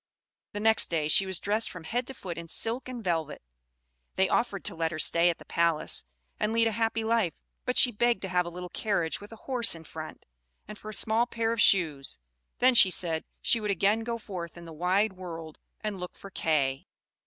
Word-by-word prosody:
The 205 - -3
next 220 +1 +3
day 160 -3 0
she 190 +5 +4
was 190 -2 0
dressed 215 +3 -1
from 180 -3 -9
head 240 +9 -2
to 265 - -8
foot 180 -6 -6
in 170 0 -7
silk 230 +9 -1
and 245 -3 -6
velvet. 165 - -2 0.7
They 190 - +3
offered 200 -3 0
to - - +1
let 165 0 -1
her 155 - -4
stay 170 +2 +3
at 170 - -1
the - - -14
palace, 165 - +1 0.3
and 215 +1 0
lead 230 0 +3
a 225 - +2
happy 225 0 0
life; 220 -6 0 0.2
but 250 - -1
she 250 - +6
begged 240 +1 +1
to - - -2
have 180 -1 +1
a - - -3
little 180 +1 -7
carriage 185 -6 -1
with 205 - -11
a - - -8
horse 245 -7 +2
in 165 - -11
front, 155 0 -9 0.4
and 210 0 -9
for 215 - -8
a - - -6
small 225 +4 +2
pair 230 -1 -1
of 230 - +1
shoes; 155 - +4 0.4
then, 255 +1 +5
she 210 -5 +7
said, 165 -3 -1 0.2
she 230 - +4
would 210 - -2
again 200 +3 +2
go 230 +1 -3
forth 180 -7 -7
in 170 - -10
the 165 - -9
wide 185 +6 +1
world 165 -4 -8 0.2
and 210 -3 -3
look 180 0 -7
for 195 - -11
Kay. 140 -6 0
190 Hz, 220 wpm, -28 LUFS, 170-225 Hz, 0.7 s, she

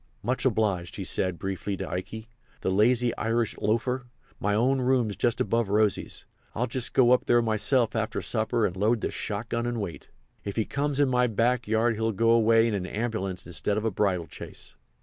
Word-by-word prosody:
"Much 125 +3 -1
obliged," 100 -7 0
he 100 - -4
said, 90 -1 0
briefly, 95 +1 -3
to - - -4
Ikey. 110 +5 -5 0.3
"The 95 - 0
lazy 120 +4 +3
Irish 115 0 0
loafer! 125 +4 0 0.3
My 105 0 0
own 130 +4 +2
room's 125 -5 +1
just 120 +4 0
above 115 -3 +1
Rosy's. 105 -1 0 0.3
I'll 120 - 0
just 125 0 -4
go 125 -2 +5
up 125 - +4
there 120 - +5
myself 115 +1 +1
after 110 -1 -1
supper 110 0 0
and 90 - -2
load 105 +4 +1
the - - -2
shot 110 +2 -4
gun 120 +1 -1
and 120 -1 -2
wait. 100 -5 -6 0.3
If 100 - -5
he 110 - 0
comes 145 0 -2
in 145 - +4
my 125 -1 +2
back 120 +2 +1
yard 110 +1 +2
he'll 110 0 0
go 115 +3 +3
away 115 0 +5
in 100 -5 -1
a - - -7
ambulance 100 -5 -3
instead 95 +4 -2
of 110 - -2
a 110 - +1
bridal 90 -4 0
chaise." - - -10
110 Hz, 200 wpm, -27 LUFS, 105-120 Hz, 0.3 s, go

